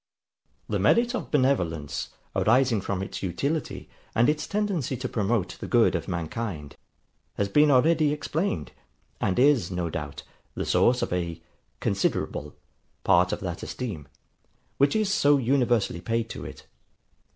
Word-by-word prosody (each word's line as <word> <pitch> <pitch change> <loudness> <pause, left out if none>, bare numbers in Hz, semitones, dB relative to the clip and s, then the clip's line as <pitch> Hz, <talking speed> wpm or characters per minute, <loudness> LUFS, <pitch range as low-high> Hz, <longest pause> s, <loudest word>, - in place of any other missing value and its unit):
The - - -1
merit 240 +1 +3
of 245 - -4
benevolence, 90 - 0 0.3
arising 120 -2 +3
from 95 0 -2
its - - -6
utility, 140 - -2 0.3
and 120 +4 +4
its 150 0 -1
tendency 200 - -1
to 130 +1 -3
promote 105 -3 -1
the - - -6
good 115 -7 +4
of 85 -3 -2
mankind 85 -3 -4 0.6
has 100 - 0
been 150 +8 +4
already 150 +3 +4
explained, 150 - -2 0.5
and 95 - 0
is, 130 -8 +4
no 90 -3 -2
doubt, 75 -3 -5 0.3
the - - -3
source 125 +1 +3
of - - -2
a 85 -2 -2 0.4
CONSIDERABLE 75 0 -1 0.5
part - - +4
of - - -3
that - - -4
esteem, 100 - -5 0.7
which 140 +6 +4
is 215 -2 +1
so 145 -7 +4
universally 120 -8 +1
paid 115 +4 -1
to - - -7
it. - - -10
115 Hz, 140 wpm, -26 LUFS, 90-145 Hz, 0.7 s, and